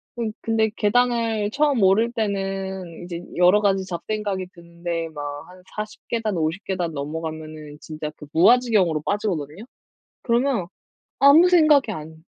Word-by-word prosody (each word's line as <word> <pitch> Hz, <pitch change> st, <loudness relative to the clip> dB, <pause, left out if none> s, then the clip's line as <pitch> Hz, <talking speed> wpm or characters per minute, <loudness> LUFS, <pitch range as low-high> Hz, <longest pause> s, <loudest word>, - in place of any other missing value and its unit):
그러니 230 Hz, -2 st, -2 dB
근데 220 Hz, -1 st, +1 dB
계단을 225 Hz, -1 st, +1 dB
처음 285 Hz, -6 st, +2 dB
오를 220 Hz, +5 st, +4 dB
때는 195 Hz, -4 st, -3 dB
이제 175 Hz, -1 st, -6 dB
여러 180 Hz, +4 st, +5 dB
가지 195 Hz, -2 st, +2 dB
잡생각이 195 Hz, +1 st, -3 dB
드는데 170 Hz, -1 st, -5 dB
막 145 Hz, -2 st, -7 dB, 0.2 s
한 185 Hz, 0 st, -15 dB
40 215 Hz, 0 st, -6 dB
계단, 220 Hz, -5 st, -2 dB
50 165 Hz, +5 st, -2 dB
계단 175 Hz, -4 st, -2 dB
넘어가면은 155 Hz, 0 st, -6 dB
진짜 155 Hz, -1 st, -6 dB
그 150 Hz, -, -11 dB
무아지경으로 190 Hz, -4 st, +4 dB
빠지거든요. 195 Hz, -3 st, -3 dB, 0.6 s
그러면 235 Hz, -5 st, +1 dB, 0.5 s
아무 310 Hz, +6 st, +7 dB
생각이 305 Hz, -9 st, +5 dB
안 160 Hz, -1 st, -9 dB
195 Hz, 295 characters per minute, -23 LUFS, 165-225 Hz, 0.6 s, 아무